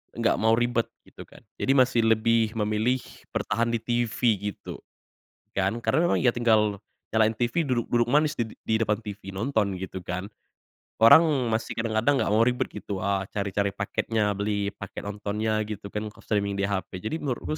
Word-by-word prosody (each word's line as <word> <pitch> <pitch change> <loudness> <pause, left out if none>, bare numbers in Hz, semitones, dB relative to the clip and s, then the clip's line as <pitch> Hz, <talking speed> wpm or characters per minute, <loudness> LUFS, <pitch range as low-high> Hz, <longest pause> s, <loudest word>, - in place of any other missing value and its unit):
Nggak 115 0 +1
mau 110 - +5
ribet 120 -1 0 0.2
gitu - - -11
kan. - - -17 0.2
Jadi - - 0
masih 130 -3 +4
lebih 115 0 +3
memilih 110 +4 +1 0.3
bertahan 115 0 0
di 115 - 0
TV 120 0 -1 0.3
gitu - - -9 0.8
kan, 95 0 +1
karena 140 +7 +1
memang - - +2
ya 125 -2 +2
tinggal 110 -3 +2 0.3
nyalain 110 -1 +4
TV, 120 +9 0
duduk-duduk 120 -3 0
manis 150 +2 +3
di 115 -4 -2 0.2
di 110 - +1
depan 105 -2 +1
TV, 105 -3 -8
nonton 100 -2 -1
gitu 95 0 -6
kan. 90 +2 -4 0.8
Orang 115 +9 +9 0.3
masih 110 +1 -1
kadang-kadang 115 +5 +1
enggak - - 0
mau 110 +2 +4
ribet 125 +1 0
gitu 100 -2 -5
a 100 -1 0
cari-cari 100 0 -1
paketnya, 105 +1 -1
beli 100 0 -1
paket 100 0 -8
nontonnya 105 +1 -2
gitu 105 -1 -6
kan 105 0 -3
kalau - - -17
streaming 100 -2 0
di 100 - -2
HP. 95 -2 -3
Jadi 110 +9 -2
menurutku 145 +2 -3
110 Hz, 170 wpm, -26 LUFS, 100-120 Hz, 0.8 s, Orang